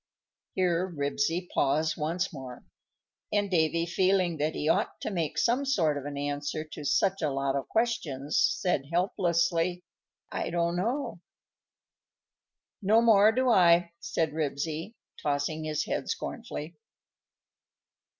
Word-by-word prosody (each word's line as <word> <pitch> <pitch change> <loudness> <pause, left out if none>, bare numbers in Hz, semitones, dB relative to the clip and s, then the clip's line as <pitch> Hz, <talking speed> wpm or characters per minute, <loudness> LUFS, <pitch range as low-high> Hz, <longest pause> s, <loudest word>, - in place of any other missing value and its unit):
_ - - -63 0.5
Here 180 0 +1
Ribsy 150 +4 -1
paused 155 +2 +1
once 170 +5 -2
more, 130 -3 -8 0.7
and 205 -1 0
Davy, 165 -1 +2
feeling 185 -1 +1
that 150 +2 -1
he 150 - -2
ought 165 - +1
to - - -3
make 170 -5 -2
some 245 +4 +2
sort 180 - +2
of 140 -1 -5
an 145 -1 -5
answer 145 +2 -3
to 155 -1 -9
such 195 +6 +1
a 155 - +1
lot 135 0 -1
of 140 - -2
questions, 160 - -1
said 180 -10 +1
helplessly, 170 0 +1 0.5
"I - - -2
don't 170 0 0
know." 235 +10 -2 1.6
"No 215 +4 +4
more 215 -2 +6
do 255 +2 +1
I," 170 -3 +5
said 160 -2 -1
Ribsy, 155 +6 -3 0.3
tossing 150 +2 -1
his 155 -1 -1
head - - -3
scornfully. 155 +3 -5
170 Hz, 130 wpm, -28 LUFS, 150-190 Hz, 1.6 s, more